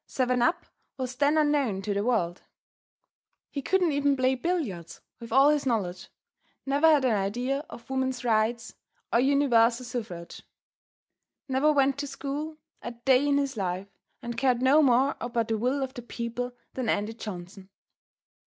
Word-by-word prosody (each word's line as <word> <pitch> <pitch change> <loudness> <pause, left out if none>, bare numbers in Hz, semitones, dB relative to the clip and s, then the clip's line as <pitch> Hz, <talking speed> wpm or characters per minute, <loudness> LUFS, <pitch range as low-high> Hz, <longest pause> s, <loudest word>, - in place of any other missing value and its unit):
"Seven 250 -1 0
up" 330 +8 +1 0.3
was 255 -1 -4
then 290 +3 +2
unknown 285 -10 +1
to 205 - -1
the 200 +1 -1
world. 195 -8 0 1.1
He 280 - -3
couldn't 360 +2 +2
even 285 -1 +1
play 260 0 +2
billiards, 245 - -3 0.2
with 230 -1 -10
all 270 +4 +6
his 295 -1 +2
knowledge, 190 -7 -2 0.6
never 280 +3 +3
had 295 -4 +5
an 250 - +3
idea 245 +8 -1
of 230 - -11
woman's 260 -2 -2
rights, 225 0 0 0.4
or - - +5
universal 255 -3 +3
suffrage; 215 -9 -6 1.1
never 270 +3 +3
went 275 -1 +2
to 285 - -3
school 285 +3 -5 0.2
a - - -5
day 255 +4 +2
in 285 -1 +3
his 275 -2 -1
life, 190 -1 -3 0.3
and 235 -1 -4
cared 255 -2 +2
no 280 +4 +6
more 265 0 +3
about 235 -1 -2
the 225 - +1
will 260 +4 0
of 265 0 -5
the 245 - -7
people 240 +1 -4 0.2
than 255 -4 -2
Andy 210 +2 0
Johnson. 190 -3 -9
250 Hz, 160 wpm, -27 LUFS, 225-280 Hz, 1.1 s, all